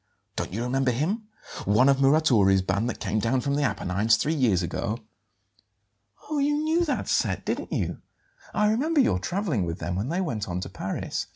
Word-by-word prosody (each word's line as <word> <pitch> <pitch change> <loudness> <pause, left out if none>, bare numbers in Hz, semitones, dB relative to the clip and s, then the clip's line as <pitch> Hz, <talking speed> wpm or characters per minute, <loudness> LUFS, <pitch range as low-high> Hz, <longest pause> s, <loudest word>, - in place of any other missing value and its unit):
Don't - - -3
you 110 +5 -3
remember 130 +1 +1
him? 180 - -1 0.4
One 105 +7 +4
of 140 -1 +5
Muratori's 130 -10 +4
band 100 +5 0
that - - -5
came 110 - -1
down 120 +4 +1
from 140 +1 -1
the 145 - +1
Apennines 105 -3 +1
three 155 - 0
years 115 - +2
ago?" 105 +5 -2 1.3
"Oh, 305 -1 -1
you 290 +1 +2
knew 315 +3 +1
that 295 - -2
set, - - 0
didn't - - -3
you? - - -2 0.5
I 210 0 +2
remember 295 +8 +1
your 90 - +3
travelling 170 - -1
with 85 0 -3
them 85 +2 -3
when 100 +8 -2
they 175 +3 -1
went 115 - -2
on 90 0 -2
to - - -5
Paris." - - -4
130 Hz, 190 wpm, -26 LUFS, -, 1.3 s, of